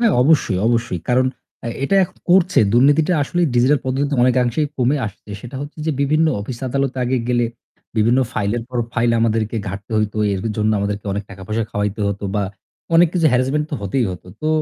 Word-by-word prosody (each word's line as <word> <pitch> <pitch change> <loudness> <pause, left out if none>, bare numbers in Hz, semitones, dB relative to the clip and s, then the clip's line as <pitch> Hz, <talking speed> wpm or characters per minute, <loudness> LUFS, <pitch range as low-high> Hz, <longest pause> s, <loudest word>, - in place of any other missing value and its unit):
হ্যাঁ 230 -3 +3
অবশ্যই, 130 - +3
অবশ্যই। 115 -7 0
কারণ 130 +1 +3 0.4
এ্যা - - -2 0.2
এটা 195 - +1
এখন - - -14
করছে, 185 0 +4
দুর্নীতিটা 145 +7 +4
আসলেই 175 +4 0
ডিজিটাল 130 +4 +4
পদ্ধতিতে 140 +2 -1
অনেকাংশেই 125 +3 +2
কমে 130 +3 +2
আসছে। 105 +1 -11
সেটা 125 +2 -8
হচ্ছে 145 +2 -8
যে 160 - +2
বিভিন্ন 155 +3 +3
অফিস 120 +3 -6
আদালতে 135 0 -1
আগে 130 +2 0
গেলে 120 -1 +2 0.5
বিভিন্ন 115 +4 +3
ফাইলের 105 +4 -1
পর 125 -1 -3
ফাইল 120 -1 +1
আমাদেরকে 115 0 0
ঘাটতে 100 +3 -7
হইতো। 105 0 -1 0.2
এর 95 - -2 0.2
জন্য 110 0 +1
আমাদেরকে 100 0 -3
অনেক 100 +1 -3
টাকা 95 -1 -10
পয়সা 110 +1 -1
খাওয়াইতে 105 +1 -2
হতো 100 0 -4
বা 105 - +1 0.5
অনেক 170 0 +6
কিছু 165 -3 +3
হ্যারাসমেন্ট 135 +4 +1
তো - - -2
হতেই 115 +6 0
হত। 90 - -8 0.2
তো 155 - 0
125 Hz, 190 wpm, -19 LUFS, 110-145 Hz, 0.5 s, অনেক